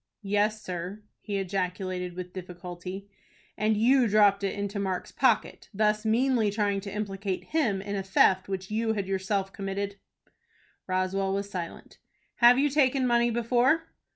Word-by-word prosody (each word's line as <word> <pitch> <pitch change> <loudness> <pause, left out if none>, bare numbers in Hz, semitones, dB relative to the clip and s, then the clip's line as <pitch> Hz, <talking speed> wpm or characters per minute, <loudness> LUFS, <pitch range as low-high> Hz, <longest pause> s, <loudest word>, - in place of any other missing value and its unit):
"Yes, 205 +2 0
sir," 185 +3 -5 0.2
he 205 -2 -4
ejaculated, 185 -1 -3
with 180 0 -7
difficulty. 180 +1 -7 0.5
"And 215 0 +1
you 250 +3 +4
dropped 200 -1 +4
it 195 - -1
into 200 0 -3
Mark's 190 -2 -3
pocket, 255 -5 +1
thus 215 +1 +1
meanly 235 -1 +2
trying 205 -1 0
to 200 0 -7
implicate 195 -2 -3
him 225 -12 0
in 205 0 -4
a 195 - -1
theft 190 0 +3
which 190 0 -4
you 220 +1 0
had 200 -3 -2
yourself 195 0 -1
committed." 200 +1 -4 0.9
Roswell 190 +1 0
was 200 0 -4
silent. 175 -3 -7 0.4
"Have 240 +1 +7
you 285 +2 +3
taken 270 -2 +3
money 240 -1 +3
before?" 245 +7 +1
200 Hz, 150 wpm, -28 LUFS, 190-220 Hz, 0.9 s, Have